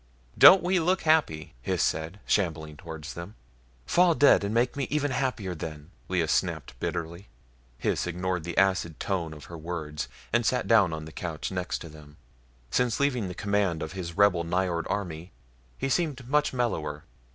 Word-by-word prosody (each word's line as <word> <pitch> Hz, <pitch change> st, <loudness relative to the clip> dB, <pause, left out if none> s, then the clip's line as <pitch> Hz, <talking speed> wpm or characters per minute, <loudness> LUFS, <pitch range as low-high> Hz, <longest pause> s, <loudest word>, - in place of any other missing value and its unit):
"Don't 190 Hz, 0 st, +9 dB
we 180 Hz, +1 st, +2 dB
look 180 Hz, +3 st, +1 dB
happy!" 155 Hz, -, +2 dB
Hys -, -, 0 dB
said, 80 Hz, +5 st, -2 dB
shambling 80 Hz, -6 st, 0 dB
towards 80 Hz, 0 st, -8 dB
them. 85 Hz, +6 st, -8 dB, 0.5 s
"Fall 175 Hz, -2 st, +4 dB
dead 145 Hz, -8 st, +5 dB
and 100 Hz, -, -1 dB
make 120 Hz, +2 st, +1 dB
me 140 Hz, -1 st, -1 dB
even 145 Hz, -1 st, 0 dB
happier 125 Hz, -8 st, -1 dB
then," 75 Hz, 0 st, -8 dB, 0.2 s
Lea 90 Hz, -3 st, +1 dB
snapped -, -, -1 dB
bitterly. 85 Hz, +3 st, -4 dB, 0.6 s
Hys -, -, 0 dB
ignored 90 Hz, 0 st, -2 dB
the 85 Hz, 0 st, -6 dB
acid 95 Hz, -4 st, +2 dB
tone 90 Hz, -5 st, -2 dB
of 75 Hz, -1 st, -10 dB
her 85 Hz, -, -9 dB
words 75 Hz, -2 st, -4 dB, 0.3 s
and 120 Hz, 0 st, +3 dB
sat 125 Hz, +2 st, 0 dB
down 105 Hz, -7 st, +5 dB
on 80 Hz, -1 st, -5 dB
the 80 Hz, -, -10 dB
couch 80 Hz, +1 st, -5 dB
next 90 Hz, -1 st, -2 dB
to -, -, -7 dB
them. 75 Hz, -1 st, -14 dB, 0.5 s
Since 125 Hz, -3 st, +1 dB
leaving 125 Hz, -9 st, 0 dB
command 100 Hz, -5 st, 0 dB
of 80 Hz, -, -5 dB
his 85 Hz, -3 st, -6 dB
rebel 100 Hz, -4 st, +4 dB
Nyjord 85 Hz, 0 st, -1 dB
army 90 Hz, -3 st, -4 dB, 0.4 s
he 135 Hz, -, -2 dB
seemed 140 Hz, -4 st, -1 dB
much 150 Hz, +3 st, +2 dB
mellower. 80 Hz, -, -2 dB
90 Hz, 170 wpm, -27 LUFS, 80-120 Hz, 0.6 s, Don't